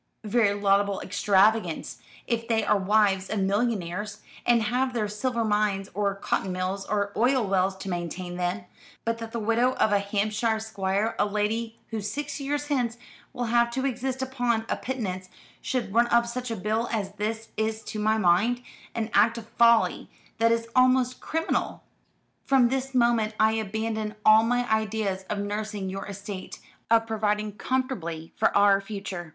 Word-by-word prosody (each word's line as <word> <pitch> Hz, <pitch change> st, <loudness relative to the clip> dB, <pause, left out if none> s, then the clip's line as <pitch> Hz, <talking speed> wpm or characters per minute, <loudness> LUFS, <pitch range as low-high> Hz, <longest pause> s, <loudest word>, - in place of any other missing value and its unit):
"Very 210 Hz, -1 st, +2 dB
laudable 200 Hz, -1 st, +2 dB
extravagance, 205 Hz, +3 st, +1 dB, 0.3 s
if 230 Hz, -1 st, -2 dB
they 225 Hz, -2 st, +1 dB
are -, -, +3 dB
wives 195 Hz, -1 st, +2 dB
of 215 Hz, -2 st, -1 dB
millionaires, 205 Hz, -1 st, -1 dB, 0.3 s
and 235 Hz, -2 st, +4 dB
have 250 Hz, +4 st, 0 dB
their 220 Hz, -3 st, 0 dB
silver 230 Hz, +3 st, -1 dB
mines, 210 Hz, -2 st, 0 dB
or 200 Hz, -1 st, 0 dB
cotton 195 Hz, -1 st, -1 dB
mills, 185 Hz, +2 st, -3 dB
or 200 Hz, -1 st, -1 dB
oil 250 Hz, +1 st, +3 dB
wells 190 Hz, 0 st, +1 dB
to 190 Hz, -, -8 dB
maintain 175 Hz, 0 st, -4 dB
them. 180 Hz, +4 st, -2 dB, 0.4 s
But 230 Hz, 0 st, -1 dB
that 225 Hz, 0 st, -6 dB
the 235 Hz, -, -3 dB
widow 230 Hz, +4 st, +2 dB
of 215 Hz, -, +2 dB
a 205 Hz, -, +4 dB
Hampshire 215 Hz, +2 st, 0 dB
squire, 210 Hz, 0 st, -1 dB
a -, -, +3 dB
lady 220 Hz, +2 st, -1 dB
who 220 Hz, -1 st, -2 dB
six 285 Hz, +9 st, -4 dB
years 290 Hz, +1 st, -2 dB
hence 245 Hz, -5 st, -1 dB, 0.3 s
will 245 Hz, -, -4 dB
have 235 Hz, 0 st, +4 dB
to 265 Hz, +2 st, -1 dB
exist 260 Hz, 0 st, -2 dB
upon 245 Hz, -4 st, 0 dB
a -, -, +1 dB
pittance, 190 Hz, -8 st, -4 dB, 0.3 s
should 250 Hz, -6 st, -2 dB
run 235 Hz, +1 st, +4 dB
up 235 Hz, 0 st, +3 dB
such 250 Hz, +1 st, -4 dB
a 230 Hz, -, -2 dB
bill 220 Hz, +4 st, -1 dB
as 205 Hz, -4 st, -2 dB
this 220 Hz, +2 st, -3 dB
is 220 Hz, 0 st, -2 dB
to 215 Hz, -, -6 dB
my 215 Hz, +1 st, +2 dB
mind 215 Hz, +6 st, +2 dB, 0.3 s
an 225 Hz, -1 st, -2 dB
act 225 Hz, +3 st, +4 dB
of 230 Hz, -1 st, -9 dB
folly 235 Hz, -1 st, +3 dB, 0.3 s
that 230 Hz, 0 st, +4 dB
is 230 Hz, 0 st, 0 dB
almost 255 Hz, 0 st, +3 dB
criminal. 325 Hz, +1 st, -2 dB, 0.6 s
From 260 Hz, -3 st, +4 dB
this 265 Hz, +1 st, -2 dB
moment 235 Hz, -3 st, +2 dB
I 220 Hz, 0 st, +5 dB
abandon 220 Hz, 0 st, -2 dB
all 215 Hz, 0 st, +8 dB
my 245 Hz, +2 st, +1 dB
ideas 215 Hz, -3 st, -1 dB
of 210 Hz, -, -1 dB
nursing 205 Hz, -1 st, -3 dB
your 195 Hz, +1 st, -5 dB
estate, 200 Hz, -1 st, -7 dB, 0.3 s
of 225 Hz, 0 st, +4 dB
providing 210 Hz, -1 st, -1 dB
comfortably 200 Hz, -10 st, -3 dB
for -, -, +3 dB
our 200 Hz, -1 st, +5 dB
future. 195 Hz, -4 st, -6 dB
220 Hz, 170 wpm, -26 LUFS, 200-235 Hz, 0.6 s, all